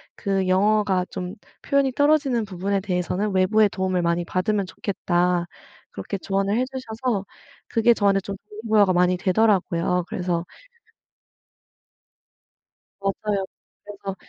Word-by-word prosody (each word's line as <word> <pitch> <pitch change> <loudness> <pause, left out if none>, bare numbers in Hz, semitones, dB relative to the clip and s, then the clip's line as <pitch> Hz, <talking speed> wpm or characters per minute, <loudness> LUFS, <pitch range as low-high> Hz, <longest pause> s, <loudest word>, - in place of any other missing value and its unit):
그 195 -1 -1
영어가 195 -1 +2
좀 180 +3 -5 0.3
표현이 280 -1 +2
떨어지는 285 -5 +2
부분에 195 +1 -2
대해서는 185 +2 -1
외부의 210 +3 +4
도움을 185 -2 -1
많이 170 +1 +1
받으면 195 +3 0
좋겠다." 180 -2 0 0.4
그렇게 200 - -5
조언을 195 +2 0
해주셔서 250 -4 -2 0.4
그게 235 +1 +4
저한테 200 -3 +2
좀 195 +1 -6 0.2
동기부여가 210 -3 +2
많이 180 +1 +3
되더라고요. 180 -3 +1
그래서 175 -2 -1 2.6
맞아요. 195 0 -1 0.4
그래서 200 -1 -7
195 Hz, 295 characters per minute, -23 LUFS, 180-215 Hz, 2.6 s, 외부의